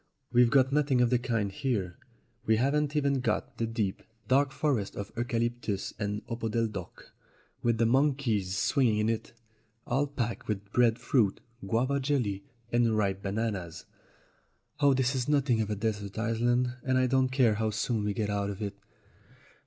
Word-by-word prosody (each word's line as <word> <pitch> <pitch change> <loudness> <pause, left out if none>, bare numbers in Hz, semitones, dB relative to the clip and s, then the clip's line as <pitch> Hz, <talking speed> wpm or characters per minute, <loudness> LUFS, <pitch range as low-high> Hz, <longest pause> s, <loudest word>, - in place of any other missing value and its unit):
We've 120 -1 +5
got 135 +1 +3
nothing 140 -3 +2
of 125 -1 +3
the 125 - +3
kind 115 -5 -1
here. 100 -6 -2 0.5
We 110 - +5
haven't 145 +5 +1
even 140 -2 +2
got 115 -4 -2
the 115 - 0
deep, 110 -4 -2 0.3
dark 135 +1 +3
forest 135 -10 -1
of 100 0 -6
eucalyptus 120 -3 -2
and 105 0 -3
opodeldoc, 115 -5 -4 0.5
with 120 -1 +1
the 115 - +3
monkeys 120 -7 +1
swinging 120 -3 +2
in 105 +1 +1
it, 115 -1 -3 0.5
all 135 +4 +1
packed 120 -5 -4
with 100 -1 -4
bread 120 -2 +3
fruit, 110 -9 +1 0.3
guava 130 +7 +1
jelly, 125 -8 -1 0.3
and 115 -2 +2
ripe 100 -2 0
bananas. 100 -5 -3 0.9
Oh, 140 -2 +4
this 130 0 +1
is 130 0 -2
nothing 135 -6 +2
of 110 - -2
a 105 - -1
desert 105 -1 -3
island, 120 +2 +1
and 130 0 +1
I 130 - +3
don't 130 0 +2
care 130 -4 +3
how 110 +1 0
soon 110 0 -1
we 105 -1 -1
get 105 -1 -1
out 100 0 -1
of 100 - -6
it 100 -2 -3
115 Hz, 165 wpm, -29 LUFS, 105-130 Hz, 0.9 s, We've